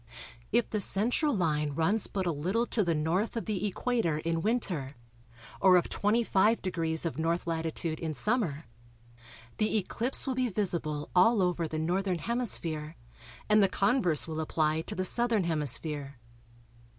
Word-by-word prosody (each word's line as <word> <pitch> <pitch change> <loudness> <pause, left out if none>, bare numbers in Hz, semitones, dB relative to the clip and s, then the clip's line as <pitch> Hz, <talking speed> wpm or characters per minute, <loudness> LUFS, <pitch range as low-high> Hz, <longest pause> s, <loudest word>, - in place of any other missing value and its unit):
If 235 +1 +2
the 215 - -2
central 235 - +2
line 150 - 0
runs 195 +7 +1
but 190 -2 -3
a 175 - +1
little 185 +10 -1
to 225 -3 0
the 170 -2 +1
N. 150 - -2
of 205 +7 -1
the 210 -2 -1
Equator 205 -6 -1
in 165 +1 -2
Winter 175 - -1 0.7
or 185 -1 +7
of 175 - 0
25° 190 -6 +1
of 160 -3 -3
N. 165 +2 +1
latitude 165 -1 -3
in 160 -2 -4
Summer, 170 - 0 0.9
the 215 0 +1
eclipse 230 +6 -1
will 265 - -1
be 255 -1 0
visible 170 -7 -2
all 200 +3 +5
over 175 -2 0
the 155 - -4
Northern 180 +3 0
Hemisphere, 165 -7 -2 0.5
and 215 0 +5
the 195 - +4
converse 185 - +2
will 160 -1 -4
apply 155 0 0
to - - -7
the 185 - -2
Southern 235 0 +2
Hemisphere. 150 -3 -2
180 Hz, 150 wpm, -29 LUFS, 160-215 Hz, 0.9 s, or